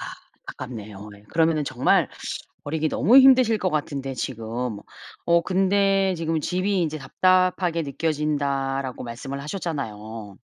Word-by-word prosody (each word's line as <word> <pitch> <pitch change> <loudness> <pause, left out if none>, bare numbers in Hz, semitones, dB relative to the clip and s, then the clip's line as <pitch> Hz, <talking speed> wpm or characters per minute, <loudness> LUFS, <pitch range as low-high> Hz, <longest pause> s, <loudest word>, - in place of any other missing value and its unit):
아 - - -6 0.4
안타깝네요. 105 -5 -8
예. 100 - -19
그러면은 160 -2 +2
정말 130 -2 +2 0.6
버리기 155 +1 -1
너무 230 - +5
힘드실 255 -4 +6
것 185 -3 0
같은데 140 -3 -3
지금. 115 -2 -4 0.5
어 170 0 +5
근데 195 0 +2
지금 160 -1 -1
"집이 185 +3 0
이제 155 -2 -2
답답하게 185 +2 +2
느껴진다."라고 140 -3 -2
말씀을 135 +4 -6
하셨잖아요. 115 - -5
150 Hz, 310 characters per minute, -24 LUFS, 130-185 Hz, 0.6 s, 힘드실